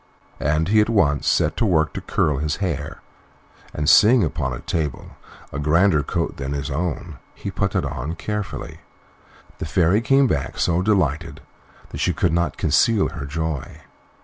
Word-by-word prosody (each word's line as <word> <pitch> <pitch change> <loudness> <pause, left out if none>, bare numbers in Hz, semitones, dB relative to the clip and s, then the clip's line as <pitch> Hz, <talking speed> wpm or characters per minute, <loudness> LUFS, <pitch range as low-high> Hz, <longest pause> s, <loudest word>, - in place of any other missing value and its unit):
And 75 +4 0
he 110 +1 +5
at 105 - 0
once 75 -10 +2
set 75 - +2
to - - +1
work 80 -4 +2
to - - -5
curl 75 -3 0
his 75 +1 -1
hair, 80 -7 -4 0.7
and, 75 0 -3
seeing 110 +6 +6
upon 75 -5 -2
a 65 - -6
table 75 -5 -3 0.4
a 70 - -3
grander 80 +2 +3
coat - - -3
than 70 0 -4
his 70 -1 -4
own, 80 -1 -3 0.2
he - - -6
put - - -2
it - - +1
on 75 +7 -4
carefully. 105 +3 -5 0.8
The - - -3
Fairy 95 +4 +2
came 135 +3 +4
back - - -2
so 85 +1 +1
delighted 80 -7 0 0.5
that - - -7
she - - +1
could 85 - 0
not 85 0 0
conceal 95 - +2
her 70 - -7
joy. 80 -1 -4
80 Hz, 170 wpm, -22 LUFS, 75-95 Hz, 0.8 s, seeing